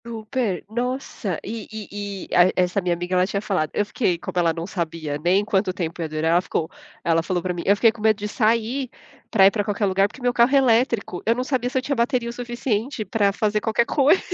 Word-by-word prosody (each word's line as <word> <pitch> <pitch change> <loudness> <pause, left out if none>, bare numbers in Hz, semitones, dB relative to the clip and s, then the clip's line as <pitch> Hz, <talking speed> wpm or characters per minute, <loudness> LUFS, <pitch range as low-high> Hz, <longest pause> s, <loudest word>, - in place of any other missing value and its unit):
Super! 225 -3 -3
Nossa, 240 - -3
e 220 0 -6
e 205 -2 -6
e - - 0
a 180 +1 +6
essa 180 +2 +1
minha 175 -1 0
amiga, 175 +2 -4
ela 180 0 +3
tinha 200 - -2
falado 180 -7 -1
eu 205 - +1
fiquei 205 -4 0
como - - -7
ela 170 -1 +3
não 165 +1 -5
sabia 165 -5 -4
nem 190 +4 +3
quanto 195 -2 +1
tempo 170 -2 -4
ia 160 - -3
durar, 155 +1 0
ela 175 +1 +4
ficou 160 -3 -3 0.3
ela 165 -1 +2
falou 175 0 -2
pra 180 - -1
mim: 175 - -4
“Eu 200 - +6
fiquei 225 +2 +4
com 225 -1 -13
medo 215 -1 +3
de 210 0 -4
sair 230 +4 0 0.4
pra 195 -4 +5
ir 195 - +7
pra 205 -1 -1
qualquer 205 +1 -1
lugar, 195 +1 +3
porque 205 - -15
meu 245 0 +1
carro 240 +1 +4
é - - +7
elétrico. 235 -7 +2
Eu 230 - +2
não 250 - -1
sabia 255 -2 -1
se 260 - -2
eu - - +2
tinha 280 - -1
bateria 235 0 0
o - - -6
suficiente 240 -1 -3
pra 205 -3 +1
fazer 210 +1 0
qualquer 225 +2 +1
coisa". 285 +8 +3
205 Hz, 245 wpm, -23 LUFS, 180-235 Hz, 0.4 s, ir